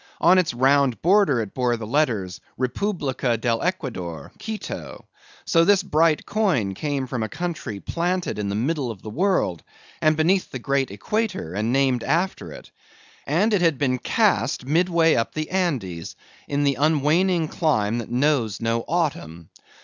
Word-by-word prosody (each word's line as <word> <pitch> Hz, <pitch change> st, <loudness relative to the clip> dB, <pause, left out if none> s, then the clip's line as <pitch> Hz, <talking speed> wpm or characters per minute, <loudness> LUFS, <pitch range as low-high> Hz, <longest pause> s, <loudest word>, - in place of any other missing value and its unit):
On 185 Hz, +2 st, +5 dB
its 180 Hz, -, +1 dB
round 135 Hz, +1 st, +2 dB
border 180 Hz, -, +4 dB
it 105 Hz, -3 st, -6 dB
bore 125 Hz, -2 st, 0 dB
the 110 Hz, -, -6 dB
letters, 115 Hz, -8 st, -1 dB, 0.2 s
REPUBLICA 130 Hz, -, -1 dB
DEL 115 Hz, 0 st, 0 dB
ECUADOR: 95 Hz, -, -4 dB
QUITO. 220 Hz, -1 st, -6 dB, 0.4 s
So 165 Hz, -1 st, +4 dB
this 195 Hz, +1 st, +4 dB
bright 160 Hz, -3 st, +2 dB
coin 165 Hz, -, 0 dB
came 140 Hz, +3 st, -2 dB
from 125 Hz, -2 st, -4 dB
a 110 Hz, -, -2 dB
country 155 Hz, -, -4 dB
planted 175 Hz, -, -2 dB
in 100 Hz, -1 st, -2 dB
the 100 Hz, -, -2 dB
middle 135 Hz, +3 st, -1 dB
of 105 Hz, -5 st, -8 dB
the 110 Hz, -, -7 dB
world, 160 Hz, -, 0 dB, 0.4 s
and 155 Hz, 0 st, +3 dB
beneath 180 Hz, +4 st, +2 dB
the -, -, -5 dB
great 135 Hz, +1 st, 0 dB
equator, 185 Hz, -, -3 dB
and 110 Hz, +4 st, -1 dB
named 130 Hz, -3 st, +2 dB
after 180 Hz, +4 st, -1 dB
it; -, -, -12 dB, 0.6 s
and 210 Hz, +5 st, +2 dB
it 200 Hz, -, +2 dB
had 165 Hz, -5 st, +3 dB
been 130 Hz, -2 st, 0 dB
cast 175 Hz, -, +1 dB
midway 165 Hz, +2 st, +3 dB
up 115 Hz, -, -1 dB
the 155 Hz, 0 st, -3 dB
Andes, 125 Hz, -, -2 dB, 0.3 s
in 145 Hz, 0 st, 0 dB
the 140 Hz, -3 st, +1 dB
unwaning 160 Hz, +3 st, +2 dB
clime 115 Hz, -10 st, 0 dB
that 115 Hz, -, -6 dB
knows 125 Hz, -4 st, +1 dB
no 115 Hz, 0 st, -1 dB
autumn. 85 Hz, -, -2 dB
140 Hz, 160 wpm, -23 LUFS, 115-170 Hz, 0.6 s, On